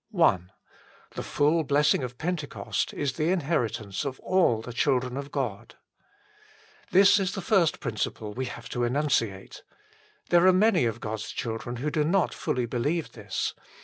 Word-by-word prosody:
I 115 - +5 0.7
The - - -5
full 155 +3 +2
blessing 145 +1 +3
of 125 -1 -5
Pentecost 160 -3 -2
is 140 -3 -2
the 155 +5 0
inheritance 135 - -1
of 135 -2 -4
all 180 -12 +2
the 120 - -7
children 125 0 +1
of 140 +1 -6
God. 125 -8 -4 1.1
This 200 +2 +6
is 195 -1 -1
the - - -3
first 190 -4 +2
principle 110 -3 -3
we 130 +3 -3
have 120 -2 -8
to 120 - -4
enun 135 +5 0
ciate. 100 -7 -1 0.7
There 175 +1 +5
are 185 - +7
many 205 - +4
of 115 0 -2
God 110 0 -3
s - - -6
children 115 +1 -4
who 145 +5 -2
do 155 -1 +1
not 180 +4 +1
fully 125 -1 -1
believe 145 +8 -1
this. 100 -4 -3
140 Hz, 165 wpm, -27 LUFS, 120-165 Hz, 1.1 s, are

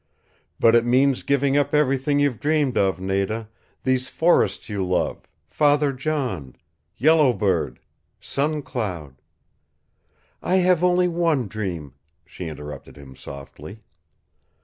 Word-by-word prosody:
"But 115 - +5
it 120 -1 +5
means 130 +2 +2
giving 140 0 +1
up 145 0 +1
everything 140 0 +2
you've 140 -6 +1
dreamed 150 -4 +1
of, 95 -2 +1
Nada 100 +4 -2 0.3
these 130 0 0
forests 170 +2 +2
you 100 -3 -2
love, 90 -1 -2 0.2
Father 145 -1 +2
John, 130 - -3 0.4
Yellow 150 -1 +4
Bird, 95 -8 -1 0.4
Sun 150 +1 -2
Cloud 85 - -5 0.6
" - - -42
"I 185 - 0
have 180 -2 +3
only 180 0 +3
one 165 -8 0
dream," 90 -9 -5 0.3
she 90 - -8
interrupted 75 -1 -9
him 70 -2 -13
softly. 70 +10 -11
130 Hz, 125 wpm, -23 LUFS, 95-145 Hz, 0.6 s, But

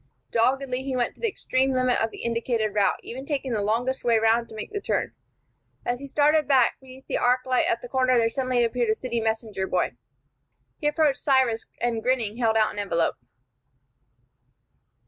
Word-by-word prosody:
Doggedly 255 +2 +1
he 265 -1 -3
went 245 -1 0
to - - -22
the 465 - +1
extreme 265 -9 0
limit 255 -1 +2
of 225 - +1
the - - -10
indicated 230 -2 -1
route, 205 -1 +2
even 260 +3 -7
taking 275 -2 -3
the 215 - 0
longest 235 +6 -1
way 235 -2 +3
round 225 +1 +2
to - - -11
make 215 - -7
the 410 -1 -4
turn. - - -1 0.7
As 245 0 -1
he 280 - -8
started 300 +1 +3
back, 265 -4 +3
beneath 260 0 -14
the - - -2
arc 250 +1 +2
light 255 -1 +2
at 235 - 0
the - - -7
corner 255 0 +2
there 230 -1 +3
suddenly 255 0 0
appeared 235 0 0
a 220 - +3
city 235 0 -3
messenger 220 -3 -2
boy. 185 - 0 0.9
He 295 - 0
approached 295 -2 +2
Cyrus, 260 -5 +2
and, 235 -2 -1
grinning, 235 -3 0
held 225 -2 +2
out 215 -1 +2
an 205 - -6
envelope. 170 -5 0
245 Hz, 190 wpm, -25 LUFS, 225-265 Hz, 0.9 s, way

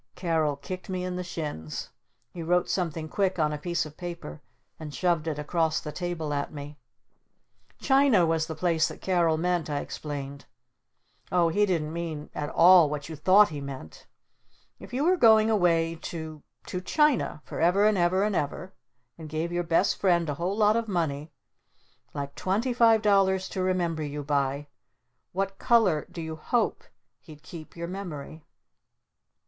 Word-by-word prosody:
Carol 160 -5 0
kicked 180 +8 -8
me 185 -1 -2
in 180 0 -3
the 180 - -3
shins. 150 - -5 0.4
He 175 - -7
wrote 180 +2 +1
something 165 -4 -2
quick 190 +2 0
on 150 -2 +1
a 150 - -4
piece 170 +2 -1
of 155 0 -12
paper 175 -3 -7 0.4
and 155 -2 -7
shoved 170 0 0
it 155 -2 -2
across 160 +1 0
the 150 - -6
table 170 -3 -3
at 140 0 -2
me. 145 0 -9 1.0
"China 270 -9 +4
was 160 -1 0
the 160 - -5
place 165 -1 +1
that - - -9
Carol 170 -4 +2
meant!" 175 -1 0
I 145 - -1
explained. 140 -2 -6 0.9
"Oh 175 -2 +3
he 205 +5 +2
didn't 160 -4 -1
mean 165 -3 -5
at 145 0 -4
all 175 -2 +7
what 145 0 -5
you 160 - -6
thought 190 +7 +5
he 150 -3 -6
meant! 130 - -9 0.7
If - - -12
you 260 +4 -1
were 365 +3 +3
going 220 -5 +6
away 165 -5 +2
to 160 -2 -7 0.2
to 180 - -4
China 290 - +1
for - - -7
ever 180 +5 +4
and 215 0 +4
ever 185 +1 +2
and 210 -1 0
ever 180 +6 -3 0.5
and 160 -1 -8
gave 160 +3 -2
your 175 0 -1
Best 170 +3 +2
Friend 175 -4 +2
a 145 - -1
whole 180 +7 -2
lot 210 0 +4
of 230 -1 -1
money 160 -6 -2 0.8
like 140 0 -4
twenty 220 +7 -1
five 230 -2 +4
dollars 190 -2 +3
to 190 - -3
remember 175 -3 0
you 145 -1 -4
by 140 0 -1 0.7
what 195 +1 -3
color 225 - +3
do 165 - -6
you 160 0 -6
hope 235 +9 -1 0.4
he'd 150 -2 -14
keep 160 -3 -11
your 170 0 -4
memory?" 165 -5 -7
170 Hz, 170 wpm, -27 LUFS, 150-190 Hz, 1.0 s, all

